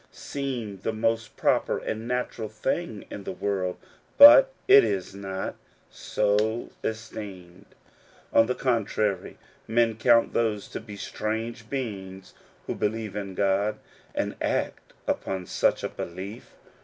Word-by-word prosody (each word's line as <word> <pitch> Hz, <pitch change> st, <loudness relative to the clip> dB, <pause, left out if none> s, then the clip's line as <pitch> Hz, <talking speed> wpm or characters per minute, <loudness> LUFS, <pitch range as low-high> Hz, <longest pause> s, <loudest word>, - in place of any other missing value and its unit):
seem 125 Hz, -8 st, -5 dB
the 105 Hz, -, -2 dB
most 110 Hz, +1 st, -1 dB
proper -, -, +2 dB
and 110 Hz, +1 st, -4 dB
natural 125 Hz, -3 st, -2 dB
thing 110 Hz, -, -3 dB
in 100 Hz, -, -6 dB
the -, -, -4 dB
world; 95 Hz, -3 st, -2 dB, 0.4 s
but 300 Hz, +14 st, +10 dB, 0.2 s
it 405 Hz, +1 st, +9 dB
is 95 Hz, 0 st, -2 dB
not 95 Hz, -1 st, -4 dB, 0.4 s
so 105 Hz, +2 st, 0 dB
esteemed: 100 Hz, -4 st, -6 dB, 0.7 s
on 115 Hz, -, +6 dB
the 125 Hz, -, 0 dB
contrary^ 110 Hz, -6 st, 0 dB, 0.3 s
men 115 Hz, 0 st, +2 dB
count 115 Hz, +1 st, +4 dB
those 110 Hz, -3 st, 0 dB
to -, -, -6 dB
be 105 Hz, -2 st, -10 dB
strange 110 Hz, +2 st, -4 dB
beings 95 Hz, -8 st, -5 dB, 0.3 s
who -, -, -2 dB
believe 110 Hz, -1 st, -2 dB
in 100 Hz, -2 st, -5 dB
God, 100 Hz, +2 st, +1 dB, 0.4 s
and -, -, -1 dB
act -, -, -2 dB, 0.2 s
upon 95 Hz, -1 st, -2 dB
such -, -, +1 dB
a -, -, -1 dB
belief. 95 Hz, +6 st, -8 dB
110 Hz, 130 wpm, -26 LUFS, 100-115 Hz, 0.7 s, but